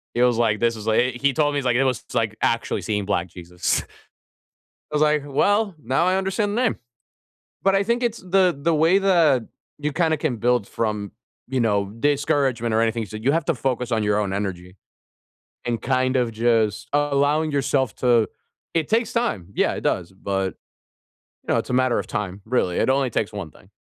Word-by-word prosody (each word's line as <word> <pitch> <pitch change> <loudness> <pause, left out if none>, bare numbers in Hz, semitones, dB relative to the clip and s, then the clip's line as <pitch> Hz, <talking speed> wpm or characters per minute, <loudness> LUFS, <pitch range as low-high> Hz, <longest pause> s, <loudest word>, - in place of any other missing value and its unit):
He 120 - +1
was 125 -2 +3
like, 110 -3 +1
"This 115 -1 +1
is 105 - -8
like" 110 - +3
he 125 0 -2
he 140 -1 +3
told 145 +1 +1
me, - - 0
he's 140 - -2
like, 125 -2 +2
"It 130 - +3
was 130 -4 -1
like 110 -1 0
actually 115 0 0
seeing 105 -2 -2
Black 90 -3 -1
Jesus." 90 0 -2 1.1
I - - -3
was 150 - +1
like, 150 -1 +3
"Well, 200 +8 +1
now 135 +8 +1
I 185 +1 +2
understand 205 +2 -1
the - - +2
name." 225 - +1 0.9
But 195 0 +3
I 195 - +3
think 235 +4 0
it's 235 -2 -1
the 185 -3 +2
the 160 +4 +1
way 165 +5 +4
that 170 -10 +3 0.3
you 150 0 -2
kinda 160 0 +1
can 145 -5 -1
build 120 -1 +1
from, 105 -3 -3 0.4
you 130 0 -1
know, 100 -3 +1
discouragement 140 -5 +1
or 110 - +3
anything. 115 0 0
So 110 +1 -8
you 130 +6 +1
have 165 -2 0
to 170 - +1
focus 125 -1 -2
on 110 -2 +1
your 105 0 +1
own 100 -2 -1
energy 95 -2 -4 0.9
and 120 -1 -1
kind 130 0 +1
of 120 -2 +1
just 110 -2 +1
allowing 145 +2 +2
yourself 135 -3 0
to 120 -3 +3 0.4
it 165 -3 0
takes 225 +1 +1
time. 170 - -1
Yeah, - - +1
it - - -5
does. 90 -1 -1
But, 95 0 -3 0.9
you - - +1
know, - - +3
it's - - -3
a 125 - -2
matter 130 -1 +2
of - - -5
time, 100 -4 -4
really. 110 -7 0
It - - +2
only 135 -1 +2
takes 105 -1 -1
1 95 -7 -6
thing. 95 - -20
125 Hz, 205 wpm, -23 LUFS, 110-150 Hz, 1.1 s, way